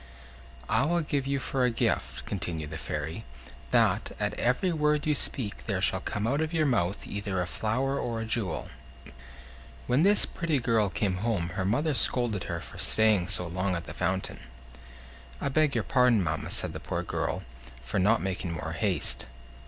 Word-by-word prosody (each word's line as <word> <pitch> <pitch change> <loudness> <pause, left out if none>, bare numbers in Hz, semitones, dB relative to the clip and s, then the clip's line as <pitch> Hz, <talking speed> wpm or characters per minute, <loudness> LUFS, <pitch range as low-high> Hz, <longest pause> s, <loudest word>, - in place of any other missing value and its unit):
"I - - +3
will 170 +2 +2
give 145 -3 -1
you 140 0 +1
for 135 0 -1
a 125 - +4
gift," 115 - -1
continued 80 -6 -3
the 80 - -5
Fairy, 80 +8 -3 0.5
"that, - - +2
at - - 0
every 125 +10 +1
word 150 -1 +2
you 155 - +3
speak, 125 -6 -2
there - - 0
shall - - +3
come 105 +1 -3
out 140 +6 +1
of 160 0 -1
your 160 -2 +2
mouth 100 -8 0
either 100 -2 -3
a 90 - +1
flower 125 +9 -1
or 115 -2 -2
a 115 - -3
jewel." 110 -5 -2 1.2
When 125 +4 +3
this 200 +4 +5
pretty 165 -3 -1
girl 115 -4 +2
came 95 0 0
home 100 -5 -1
her 95 +1 -2
mother 145 +10 +1
scolded 120 -6 +2
her - - -3
for - - -10
staying 110 -5 +3
so 95 -3 0
long 90 +2 -1
at 85 - -3
the - - -7
fountain. 95 +2 -1 1.0
"I 140 - -1
beg 150 0 +2
your - - +1
pardon, 125 -6 +4
mamma," 80 - -2
said - - 0
the - - -5
poor - - -3
girl, - - -2 0.4
"for 70 +11 -1
not 105 +3 +3
making 90 -2 -2
more 80 - -4
haste." - - 0
110 Hz, 185 wpm, -28 LUFS, 95-135 Hz, 1.2 s, this